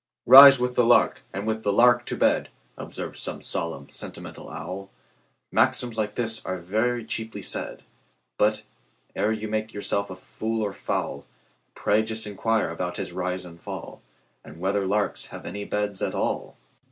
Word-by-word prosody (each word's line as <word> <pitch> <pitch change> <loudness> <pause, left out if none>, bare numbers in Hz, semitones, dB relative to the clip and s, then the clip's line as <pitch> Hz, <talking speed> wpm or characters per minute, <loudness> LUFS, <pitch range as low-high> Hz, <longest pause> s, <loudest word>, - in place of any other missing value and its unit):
"Rise 135 +2 +11
with 125 0 -1
the 125 - +3
lark, 120 +1 +4
and 100 +2 -4
with 110 0 -1
the 100 - +1
lark 120 +3 +4
to - - -3
bed,"Observes - - -2
some - - -2
solemn, 70 -5 -3
sentimental - - -8
owl; 95 +3 -7 0.6
Maxims 120 -2 +2
like 105 -1 -2
these 115 -2 -2
are 95 - -3
very 110 +7 -1
cheaply 110 -3 -4
said; - - -3 0.6
But, 105 +1 +2 0.5
ere 105 - +1
you 110 0 -3
make 110 0 -3
yourself 100 0 -1
a 95 - -7
fool 110 +4 -4
or 100 -2 -2
fowl, - - -3 0.5
Pray 105 +1 +2
just 110 0 -4
inquire 105 -2 0
about 90 +1 -4
his - - -5
rise 90 0 -3
and 85 -1 -13
fall, - - -8 0.4
And 75 +3 -13
whether 95 +2 0
larks 105 +1 -1
have - - -10
any 100 0 -5
beds 105 -1 -2
at - - -1
all! - - -2
105 Hz, 165 wpm, -25 LUFS, 95-110 Hz, 0.6 s, Rise